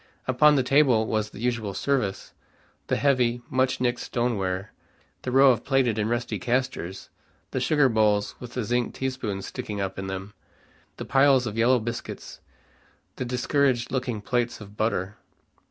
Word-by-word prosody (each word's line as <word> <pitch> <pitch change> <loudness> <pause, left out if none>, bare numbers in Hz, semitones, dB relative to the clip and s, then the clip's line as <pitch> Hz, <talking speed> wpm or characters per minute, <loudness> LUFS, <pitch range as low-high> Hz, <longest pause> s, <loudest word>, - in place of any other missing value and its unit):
Upon 150 +4 +5
the 135 - +2
table 130 -5 +4
was 110 -1 -1
the 105 - -12
usual 115 -5 -1
service, 105 -6 -1 0.5
the - - +1
heavy, 125 -4 +1
much 130 0 +1
nicked 125 -1 0
stone 120 -1 -1
ware, 95 0 -3 0.5
the - - -4
row 135 +1 +7
of 120 - -1
plated 130 -5 +1
and 105 +1 0
rusty 120 -3 -2
castors, 120 -5 -2 0.4
the 130 - -1
sugar 145 +2 +3
bowls 105 -3 +2
with 125 -1 -9
the 125 - -1
zinc 120 +2 -1
tea 130 0 -1
spoons 105 -7 -4
sticking 105 -1 -5
up 95 -1 -3
in 95 - -4
them, 95 +2 -6 0.6
the - - -6
piles 135 -2 +4
of 110 -2 -4
yellow 120 +3 +4
biscuits, 120 0 -6 0.8
the 130 - -3
discouraged 125 0 +1
looking 125 -5 -2
plates 120 +2 -1
of 105 -1 -12
butter. 105 -3 -1
120 Hz, 165 wpm, -25 LUFS, 105-130 Hz, 0.8 s, row